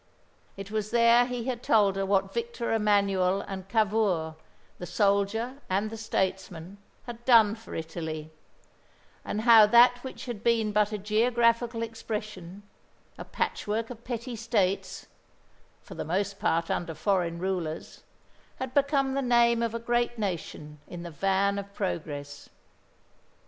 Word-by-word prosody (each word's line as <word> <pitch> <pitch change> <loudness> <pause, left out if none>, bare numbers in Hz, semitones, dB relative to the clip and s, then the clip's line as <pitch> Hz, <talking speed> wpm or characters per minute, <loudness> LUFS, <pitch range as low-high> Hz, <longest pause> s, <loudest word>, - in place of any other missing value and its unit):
It 195 +1 -8
was 215 -1 -2
there 235 +1 +5
he 250 -2 -4
had 245 -1 -3
told 205 -5 +3
her 195 0 -2
what 195 0 +1
Victor 235 0 -3
Emanuel 200 -3 +2
and 195 -1 -8
Cavour 200 -7 +1 0.4
the 175 - -6
soldier 205 - 0
and 200 +3 0
the - - -6
statesman 190 -3 -3 0.3
had 235 -1 -9
done 230 -4 +6
for 225 0 -10
Italy; 160 -1 -5 0.9
and 215 - -3
how 225 -2 +8
that 245 +2 +5
which 260 - -8
had 235 -4 -6
been 225 -2 +2
but 210 0 +2
a 210 - -2
geographical 230 +2 +1
expression, 210 -4 -6 0.6
a - - -5
patchwork 220 +3 -3
of 235 -1 -10
petty 240 0 -5
states 205 -4 -1 0.8
for - - -11
the - - -5
most 195 +4 -2
part 165 0 0
under 165 -2 -3
foreign 175 -1 0
rulers 175 -3 -4 0.5
had 260 -1 -6
become 275 -1 +2
the 275 - 0
name 235 -2 +3
of 230 -1 -1
a - - -2
great 240 +1 0
nation 165 -7 -5
in 175 -1 -8
the 170 - -7
van 195 +4 +1
of 200 0 -8
progress. 145 -6 -5
210 Hz, 145 wpm, -27 LUFS, 190-235 Hz, 0.9 s, how